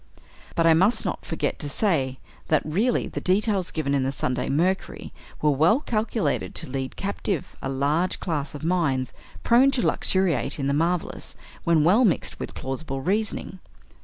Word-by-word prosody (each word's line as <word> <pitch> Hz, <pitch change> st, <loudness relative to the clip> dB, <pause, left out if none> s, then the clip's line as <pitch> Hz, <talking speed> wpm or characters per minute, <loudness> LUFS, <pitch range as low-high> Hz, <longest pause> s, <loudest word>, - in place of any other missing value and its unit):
But 165 Hz, -, +2 dB
I 165 Hz, -, +7 dB
must 200 Hz, +8 st, +3 dB
not -, -, -3 dB
forget 155 Hz, -3 st, -2 dB
to 145 Hz, -, -3 dB
say 140 Hz, -, 0 dB, 0.3 s
that, 155 Hz, -2 st, +2 dB
really, 205 Hz, +11 st, +1 dB
the -, -, -5 dB
details 195 Hz, -1 st, +1 dB
given 145 Hz, -3 st, -2 dB
in 140 Hz, -, +2 dB
the 130 Hz, +1 st, 0 dB
"Sunday 125 Hz, -2 st, -2 dB
Mercury" 175 Hz, +7 st, -1 dB, 0.3 s
were 150 Hz, -, +5 dB
well 160 Hz, -, +4 dB
calculated 215 Hz, -, -1 dB
to -, -, -2 dB
lead 135 Hz, -1 st, -4 dB
captive 195 Hz, -4 st, -3 dB
a 135 Hz, -, -3 dB
large 145 Hz, +7 st, 0 dB
class 150 Hz, -4 st, -3 dB
of 145 Hz, -, -8 dB
minds 155 Hz, -7 st, 0 dB, 0.3 s
prone 250 Hz, +4 st, +5 dB
to 265 Hz, -3 st, 0 dB
luxuriate 190 Hz, -4 st, +1 dB
in 140 Hz, -, -2 dB
the 140 Hz, -, +1 dB
marvelous 170 Hz, +3 st, -1 dB, 0.3 s
when 165 Hz, -3 st, +4 dB
well 200 Hz, +10 st, +5 dB
mixed 195 Hz, -9 st, 0 dB
with -, -, -6 dB
plausible 135 Hz, +1 st, -4 dB
reasoning. 195 Hz, +2 st, -1 dB
165 Hz, 165 wpm, -25 LUFS, 140-195 Hz, 0.3 s, I